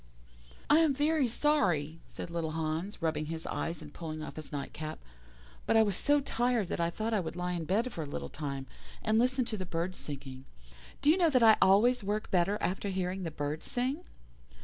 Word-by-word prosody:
"'I 300 Hz, -, +6 dB
am 320 Hz, -3 st, +4 dB
very 295 Hz, -1 st, +2 dB
sorry,' 180 Hz, -, +1 dB
said 170 Hz, -, -7 dB
little 165 Hz, -2 st, -2 dB
Hans, 160 Hz, +4 st, -3 dB
rubbing 155 Hz, -2 st, 0 dB
his 160 Hz, 0 st, -5 dB
eyes 165 Hz, -1 st, -3 dB
and 150 Hz, -, -12 dB
pulling 155 Hz, -2 st, -5 dB
off -, -, -7 dB
his 155 Hz, -1 st, -8 dB
night 140 Hz, -2 st, -4 dB
cap, 155 Hz, 0 st, -5 dB, 0.7 s
'but -, -, +4 dB
I 220 Hz, -, +7 dB
was 205 Hz, -3 st, 0 dB
so 290 Hz, +9 st, +3 dB
tired 240 Hz, -6 st, 0 dB
that -, -, -2 dB
I 170 Hz, 0 st, +2 dB
thought 220 Hz, +6 st, -2 dB
I 215 Hz, -, +3 dB
would 165 Hz, -2 st, -4 dB
lie 180 Hz, 0 st, -2 dB
in 170 Hz, -2 st, -2 dB
bed 225 Hz, +8 st, 0 dB
for 165 Hz, -, -4 dB
a 150 Hz, -, -4 dB
little 140 Hz, -, -4 dB
time, 140 Hz, -3 st, -5 dB, 0.4 s
and 220 Hz, 0 st, +3 dB
listen 255 Hz, +1 st, +2 dB
to 220 Hz, -, -3 dB
the 190 Hz, -, -3 dB
birds 175 Hz, +2 st, -2 dB
singing. 135 Hz, -2 st, -7 dB, 0.6 s
Do 295 Hz, -, +7 dB
you 340 Hz, -, +3 dB
know 345 Hz, -3 st, +4 dB
that 255 Hz, -5 st, +4 dB
I 220 Hz, -1 st, +8 dB
always 215 Hz, +5 st, +5 dB
work 210 Hz, +2 st, -2 dB
better 185 Hz, +3 st, +2 dB
after 190 Hz, +3 st, -1 dB
hearing 185 Hz, 0 st, -2 dB
the 170 Hz, -, -2 dB
birds 150 Hz, 0 st, -4 dB
sing? 265 Hz, +6 st, -1 dB
185 Hz, 215 wpm, -31 LUFS, 160-235 Hz, 0.7 s, I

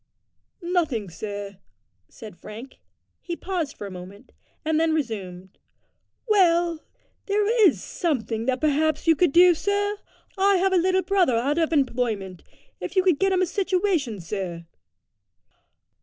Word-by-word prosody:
"Nothing, 315 Hz, -, -1 dB
sir," 200 Hz, +2 st, -7 dB, 0.5 s
said 215 Hz, -6 st, -11 dB
Frank. 225 Hz, +8 st, -11 dB, 0.4 s
He 345 Hz, -, -5 dB
paused 340 Hz, -6 st, -4 dB
for -, -, -7 dB
a 200 Hz, -, -7 dB
moment, 185 Hz, +3 st, -11 dB, 0.3 s
and 315 Hz, 0 st, +1 dB
then 320 Hz, -1 st, +2 dB
resumed 190 Hz, -, -5 dB, 0.7 s
"Well, 345 Hz, -5 st, +3 dB, 0.5 s
there 410 Hz, +1 st, +1 dB, 0.2 s
is -, -, 0 dB
something 235 Hz, -, -2 dB
that 260 Hz, -1 st, +1 dB
perhaps 310 Hz, 0 st, +1 dB
you 325 Hz, -1 st, +5 dB
could 345 Hz, 0 st, +2 dB
do, 355 Hz, +3 st, +7 dB
sir. 405 Hz, +4 st, -1 dB, 0.4 s
I 395 Hz, +1 st, +4 dB
have 380 Hz, +1 st, +2 dB
a -, -, +4 dB
little 375 Hz, +2 st, +2 dB
brother 370 Hz, -11 st, +2 dB
out 280 Hz, +7 st, 0 dB
of 325 Hz, -1 st, +1 dB
employment; 235 Hz, -, -1 dB, 0.4 s
if -, -, -6 dB
you 375 Hz, -, +4 dB
could 360 Hz, -6 st, +2 dB
get 390 Hz, 0 st, +2 dB
him 370 Hz, -1 st, +2 dB
a -, -, +3 dB
situation, 360 Hz, -, -1 dB
sir." 175 Hz, -1 st, -5 dB
310 Hz, 140 wpm, -24 LUFS, 215-365 Hz, 0.7 s, do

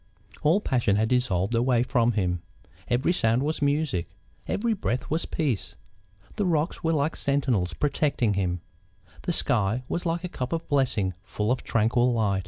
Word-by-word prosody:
All 160 Hz, +7 st, +4 dB
passion 120 Hz, -, +1 dB
had 110 Hz, +2 st, +1 dB
dissolved 120 Hz, -6 st, +1 dB
away 120 Hz, 0 st, +3 dB
from 120 Hz, -1 st, +2 dB
him; 90 Hz, -4 st, 0 dB, 0.5 s
every 125 Hz, +8 st, +2 dB
sound 115 Hz, -4 st, +2 dB
was 155 Hz, +1 st, -2 dB
music; 140 Hz, -, 0 dB, 0.4 s
every 230 Hz, +2 st, 0 dB
breath 130 Hz, -, -2 dB
was 160 Hz, +2 st, 0 dB
peace; 140 Hz, -, -2 dB, 0.6 s
the 205 Hz, -, +1 dB
rocks 165 Hz, +1 st, 0 dB
were 165 Hz, 0 st, +2 dB
like 155 Hz, +1 st, 0 dB
sentinels 130 Hz, -11 st, 0 dB
protecting 140 Hz, -6 st, +1 dB
him; 90 Hz, -3 st, -1 dB, 0.6 s
the -, -, -1 dB
sky 115 Hz, -, +1 dB
was 175 Hz, -, -2 dB
like 170 Hz, +1 st, -1 dB
a -, -, -2 dB
cup 130 Hz, -5 st, -4 dB
of 165 Hz, 0 st, -3 dB
blessing 130 Hz, -10 st, +1 dB
full 105 Hz, +1 st, -2 dB
of 125 Hz, -, 0 dB
tranquil 120 Hz, +3 st, +2 dB
light. 105 Hz, -4 st, +1 dB
125 Hz, 165 wpm, -26 LUFS, 105-150 Hz, 0.6 s, All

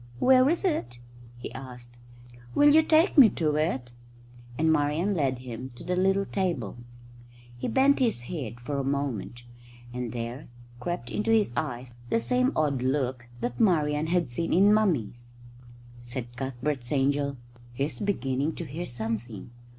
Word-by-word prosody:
"Where 260 Hz, -, +5 dB
is 345 Hz, +4 st, 0 dB
it?" 120 Hz, -, -1 dB, 0.4 s
he 120 Hz, -, -8 dB
asked. 125 Hz, -2 st, -10 dB, 0.6 s
"Will 290 Hz, 0 st, +6 dB
you 315 Hz, -, +7 dB
take 315 Hz, +1 st, +4 dB
me 245 Hz, -5 st, +10 dB
to 155 Hz, -3 st, +1 dB
it?" 135 Hz, -6 st, -1 dB, 0.7 s
And 160 Hz, +1 st, +3 dB
Marian 155 Hz, +6 st, +1 dB
led 135 Hz, -7 st, 0 dB
him 125 Hz, 0 st, -7 dB
to -, -, -10 dB
the 180 Hz, -, -1 dB
little 195 Hz, +2 st, +2 dB
table. 170 Hz, -, -2 dB, 0.8 s
He 120 Hz, -, -4 dB
bent 275 Hz, +1 st, +3 dB
his 230 Hz, -, +1 dB
head 120 Hz, -5 st, -6 dB
for 140 Hz, +3 st, -3 dB
a -, -, -1 dB
moment, 135 Hz, -4 st, -3 dB, 0.5 s
and 125 Hz, -2 st, -4 dB
there 120 Hz, +4 st, -5 dB, 0.3 s
crept 125 Hz, -2 st, -4 dB
into 215 Hz, +2 st, -1 dB
his 220 Hz, -, +3 dB
eyes 125 Hz, -4 st, -4 dB, 0.2 s
the 230 Hz, -, +2 dB
same 250 Hz, +2 st, +1 dB
odd 145 Hz, -4 st, +1 dB
look 130 Hz, -2 st, -1 dB
that 120 Hz, +1 st, -3 dB
Marian 150 Hz, -6 st, +2 dB
had 170 Hz, -6 st, 0 dB
seen 165 Hz, +7 st, -1 dB
in 200 Hz, +4 st, +6 dB
Mummy's. 120 Hz, -, 0 dB, 0.7 s
Said 120 Hz, 0 st, -6 dB
Cuthbert's 130 Hz, 0 st, -3 dB
angel, 140 Hz, 0 st, +1 dB, 0.3 s
"He's 140 Hz, +5 st, -3 dB
beginning 145 Hz, -, -1 dB
to 170 Hz, -, -5 dB
hear 160 Hz, +5 st, -5 dB
something. 115 Hz, -2 st, -5 dB
140 Hz, 150 wpm, -27 LUFS, 120-180 Hz, 0.8 s, me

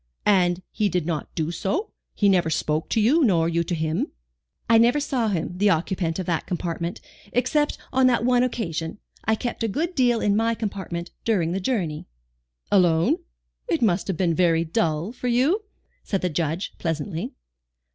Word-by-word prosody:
"And 185 Hz, -3 st, +3 dB
he 210 Hz, -1 st, +1 dB
did 175 Hz, -3 st, -1 dB
not 160 Hz, -3 st, -2 dB
do 160 Hz, -1 st, -1 dB
so? 300 Hz, -, -2 dB, 0.2 s
He 205 Hz, -, +3 dB
never 180 Hz, -4 st, +3 dB
spoke 155 Hz, 0 st, -1 dB
to -, -, +1 dB
you, 275 Hz, +10 st, +4 dB
nor 170 Hz, -9 st, +3 dB
you 170 Hz, 0 st, +1 dB
to 175 Hz, -, -1 dB
him?" 160 Hz, 0 st, -1 dB, 0.6 s
"I 230 Hz, -1 st, +6 dB
never 240 Hz, +5 st, +4 dB
saw 260 Hz, -5 st, 0 dB
him, 180 Hz, -3 st, -2 dB
the 205 Hz, +1 st, +4 dB
occupant 170 Hz, -1 st, 0 dB
of 185 Hz, -, -3 dB
that 170 Hz, -2 st, -1 dB
compartment, 170 Hz, -1 st, -3 dB, 0.3 s
except 295 Hz, +5 st, +1 dB, 0.2 s
on 260 Hz, 0 st, +5 dB
that 240 Hz, -2 st, +2 dB
one 250 Hz, -1 st, +4 dB
occasion. 170 Hz, -10 st, -2 dB, 0.3 s
I 220 Hz, -, +3 dB
kept 240 Hz, +2 st, -4 dB
a -, -, +2 dB
good 325 Hz, -, -2 dB
deal 245 Hz, -6 st, +3 dB
in 205 Hz, -2 st, +2 dB
my 225 Hz, +1 st, +2 dB
compartment 190 Hz, -6 st, -4 dB
during 185 Hz, -8 st, +1 dB
the 190 Hz, -, -1 dB
journey." 180 Hz, -8 st, -2 dB, 0.6 s
"Alone? 175 Hz, -4 st, +4 dB, 0.5 s
It -, -, 0 dB
must 190 Hz, -4 st, +2 dB
have 190 Hz, -4 st, -2 dB
been 175 Hz, -2 st, +2 dB
very 165 Hz, -1 st, +3 dB
dull 165 Hz, 0 st, 0 dB
for 250 Hz, 0 st, -5 dB
you," 280 Hz, -, +2 dB, 0.4 s
said 195 Hz, -, -1 dB
the 180 Hz, -, 0 dB
Judge, 165 Hz, +3 st, -2 dB
pleasantly. 165 Hz, -, -3 dB
190 Hz, 175 wpm, -24 LUFS, 165-230 Hz, 0.6 s, I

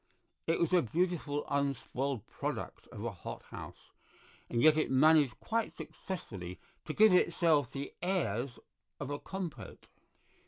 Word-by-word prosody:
It 165 Hz, -, +2 dB
was 170 Hz, +1 st, +1 dB
a 180 Hz, -, +6 dB
beautiful 155 Hz, 0 st, 0 dB
unspoiled 140 Hz, -3 st, -1 dB
product -, -, -5 dB
of 105 Hz, -, -7 dB
a 115 Hz, -, -1 dB
hothouse, 90 Hz, -, -9 dB, 0.6 s
and 120 Hz, -, 0 dB
yet 155 Hz, +5 st, +7 dB
it 155 Hz, -, +1 dB
managed 145 Hz, -2 st, +5 dB
quite 230 Hz, 0 st, -1 dB
successfully 95 Hz, -, -6 dB, 0.3 s
to 155 Hz, -, -3 dB
give 215 Hz, +1 st, +7 dB
itself 165 Hz, -6 st, +3 dB
the 140 Hz, 0 st, -5 dB
airs 135 Hz, -, 0 dB, 0.4 s
of -, -, -4 dB
a 145 Hz, -, -2 dB
compote. 190 Hz, -5 st, -6 dB
145 Hz, 130 wpm, -33 LUFS, 130-175 Hz, 0.6 s, yet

